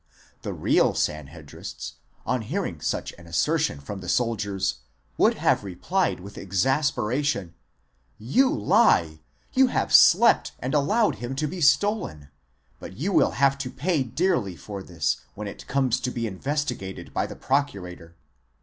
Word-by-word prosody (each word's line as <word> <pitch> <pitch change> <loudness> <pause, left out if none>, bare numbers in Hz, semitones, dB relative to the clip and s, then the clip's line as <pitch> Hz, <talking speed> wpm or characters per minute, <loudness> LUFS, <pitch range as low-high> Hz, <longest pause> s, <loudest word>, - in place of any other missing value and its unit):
The - - -4
real - - +2
Sanhedrists, 75 0 -5 0.3
on 125 -2 0
hearing 110 - -4
such - - -2
an 85 - -14
asser 85 -5 +1
tion 75 - -1
from 95 +8 -7
the 90 - -6
soldiers, 100 - 0 0.4
would - - +3
have - - +1
replied 135 - -1
with 100 +2 -10
exasperation: 120 - 0 0.6
You 140 - +2
lie! 80 -6 +3 0.3
you 265 0 +5
have - - -1
slept 205 +7 +6
and 130 +2 -4
allowed 210 +10 +2
him 120 +2 -5
to 150 +3 -1
be 175 +4 -5
stolen; 150 - +1 0.5
but 95 - -10
you 185 - -1
will - - +3
have 140 0 +3
to 135 -2 -3
pay 155 +4 0
dearly 125 - 0
for 100 +3 -8
this, 85 -5 -1 0.2
when 105 0 -6
it.comes 130 +4 -1
to - - -2
be 120 -2 -3
investigated 120 -2 -4
by - - 0
the - - -9
procurator. 90 -12 -2
120 Hz, 145 wpm, -25 LUFS, 95-145 Hz, 0.6 s, slept